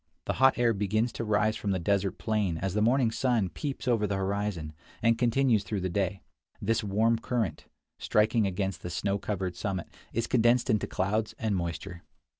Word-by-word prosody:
The - - 0
hot 130 0 +6
air 120 -1 +3
begins 110 +4 0
to - - -4
rise 110 0 +2
from 105 - -3
the 95 - +1
desert 100 +2 0
plain 105 -7 0
as 95 +2 -2
the 105 - +1
morning 120 +1 +3
sun 115 -4 +1
peeps 135 - -5
over 115 -4 +2
the 100 - -1
horizon, 95 -5 -2 0.3
and 115 0 +5
continues 120 -2 +2
through 100 0 -3
the 95 - -1
day; 95 0 -1 0.4
this 115 -1 0
warm 110 +3 +2
current, 115 -9 -2 0.3
striking 110 0 +2
against 95 -1 -2
the 90 - -5
snow 100 +3 -1
covered 95 -3 -3
summit, 95 -3 -3 0.2
is 115 +1 -1
condensed 120 +1 +3
into 105 -3 +1
clouds 105 +3 -1
and 110 -3 -1
moisture. 85 0 -4
105 Hz, 185 wpm, -29 LUFS, 95-115 Hz, 0.4 s, hot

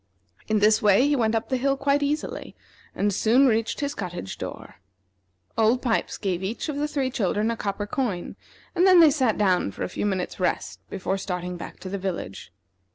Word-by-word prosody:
In 215 - +2
this 215 +1 +4
way 210 +6 +5
he 290 - +2
went 225 -3 +1
up 225 - -2
the 260 - +1
hill 275 +2 +1
quite 280 +1 +1
easily, 295 +1 -3 0.4
and 205 0 +1
soon 235 +8 +4
reached 225 0 +1
his 285 0 -1
cottage 175 - -6
door. - - -7 0.8
Old 225 +3 +2
Pipes 230 -3 0
gave 185 -3 -2
each 195 +5 -3
of 290 - -3
the 295 +1 0
three 275 -3 -1
children 215 -1 0
a - - -2
copper 205 -1 -3
coin, 205 -6 -3 0.4
and 365 +1 +4
then 370 -2 +7
they 320 -3 +8
sat 260 -7 +1
down 185 - +2
for - - -6
a - - -3
few 205 - -2
minutes' 190 -2 -3
rest 95 - -1
before 195 +1 -2
starting 180 -1 -4
back 170 - -9
to - - -7
the 195 +1 -4
village. 175 - -5
220 Hz, 200 wpm, -25 LUFS, 190-270 Hz, 0.8 s, they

